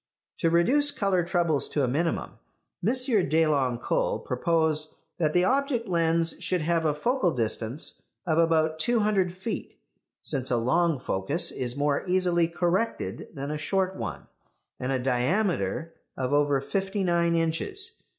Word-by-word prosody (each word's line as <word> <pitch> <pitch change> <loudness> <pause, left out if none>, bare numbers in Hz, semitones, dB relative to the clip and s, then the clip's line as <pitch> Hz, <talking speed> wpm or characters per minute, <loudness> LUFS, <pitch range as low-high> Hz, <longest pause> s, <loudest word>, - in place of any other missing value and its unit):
To 165 - +2
reduce 255 - +4
colour 195 -8 +1
troubles 170 -4 +1
to 145 - 0
a - - +2
minimum 165 +7 -2 0.4
M. 215 - +3 0.4
Deloncle 145 -6 +1
proposed 155 +3 0 0.3
that 155 -2 +1
the 180 - +4
object 260 +1 +1
lens 165 -2 +1
should 180 -2 -1
have 165 +1 +1
a 150 -2 +2
focal 235 - +1
distance 115 +3 -3 0.2
of 160 -2 +1
about 160 -1 +2
two 235 +7 +2
hundred 200 -4 +1
feet, 190 +5 -6 0.4
since 135 -4 -3
a 120 - +2
long 165 +7 +2
focus 130 - 0
is 125 -1 -3
more 145 0 +1
easily 180 -2 +2
corrected 175 - -1
than 140 +1 -4
a 150 - -3
short 190 +3 0
one, - - -5 0.5
and 125 +1 -2
a 135 - +2
diameter 130 - 0 0.2
of 130 +1 -1
over 145 -1 +3
fifty 195 +8 -2
nine 170 -1 +2
inches. 380 - -2
165 Hz, 145 wpm, -27 LUFS, 145-185 Hz, 0.5 s, reduce